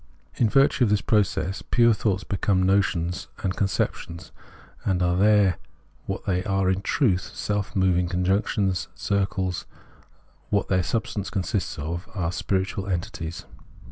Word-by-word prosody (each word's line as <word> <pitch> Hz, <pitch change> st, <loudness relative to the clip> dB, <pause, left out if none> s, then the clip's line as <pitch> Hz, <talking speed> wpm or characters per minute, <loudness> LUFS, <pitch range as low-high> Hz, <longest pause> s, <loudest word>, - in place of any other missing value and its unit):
In 115 Hz, -, +3 dB
virtue 135 Hz, +1 st, +4 dB
of 115 Hz, -, +3 dB
this 105 Hz, 0 st, +3 dB
process 100 Hz, -3 st, 0 dB
pure 120 Hz, -1 st, +4 dB
thoughts 100 Hz, -3 st, 0 dB
become 95 Hz, -1 st, +1 dB
notions 90 Hz, -2 st, +1 dB, 0.2 s
and 95 Hz, -1 st, 0 dB
con 100 Hz, -, +1 dB
ceptions, 85 Hz, -3 st, -3 dB, 0.5 s
and 90 Hz, -2 st, +1 dB
are 90 Hz, 0 st, +2 dB
then 100 Hz, -1 st, +4 dB, 0.5 s
what -, -, -4 dB
they 90 Hz, -1 st, 0 dB
are 95 Hz, -2 st, +1 dB
in 95 Hz, +1 st, -1 dB
truth, 95 Hz, -, +1 dB
self 105 Hz, -1 st, -2 dB
moving 90 Hz, -2 st, +2 dB
functions, 95 Hz, +1 st, 0 dB
circles, 95 Hz, -2 st, -1 dB
are -, -, -26 dB, 0.7 s
what 100 Hz, -, 0 dB
their 95 Hz, -1 st, +3 dB
substance 105 Hz, 0 st, -2 dB
consists 100 Hz, -2 st, -2 dB
in, 75 Hz, -, -5 dB, 0.3 s
are 90 Hz, -4 st, -1 dB
spiritual 95 Hz, +1 st, -2 dB
entities. 85 Hz, -3 st, -4 dB
95 Hz, 140 wpm, -25 LUFS, 90-105 Hz, 0.7 s, virtue